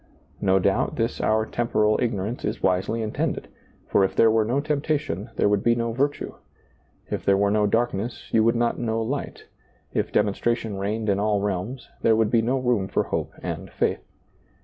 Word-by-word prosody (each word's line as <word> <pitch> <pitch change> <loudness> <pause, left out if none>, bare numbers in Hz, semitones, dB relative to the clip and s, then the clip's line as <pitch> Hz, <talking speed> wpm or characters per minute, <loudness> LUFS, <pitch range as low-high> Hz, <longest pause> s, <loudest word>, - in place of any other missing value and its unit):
No 95 -1 +4
doubt, 95 - +1
this - - -1
our 110 0 +2
temporal 110 -2 +1
ignorance 115 -1 -2
is - - -3
wisely 95 +5 +1
intended; 110 - -2 0.4
for 100 - +3
if 95 - 0
there 115 - +5
were 110 0 +3
no 120 +6 0
temptation 140 - -1
there - - +2
would 100 -1 +2
be 120 0 +4
no 115 0 -1
virtue; 140 +5 -1 0.8
if - - -2
there 100 0 +4
were 100 0 +2
no 105 0 +3
darkness 115 +1 -1
you 110 - +5
would 115 +2 +3
not 120 0 0
know 115 -1 -1
light; 130 +6 -4 0.5
if - - -1
demonstration 110 0 0
reigned 105 +3 -2
in 100 -1 +2
all 105 0 +1
realms, 100 +6 -3
there 110 - +4
would 110 -1 +2
be 115 - +4
no 125 +4 +1
room 120 -7 +1
for - - 0
hope - - -3
and - - -4
faith. - - -1
110 Hz, 185 wpm, -24 LUFS, 100-120 Hz, 0.8 s, there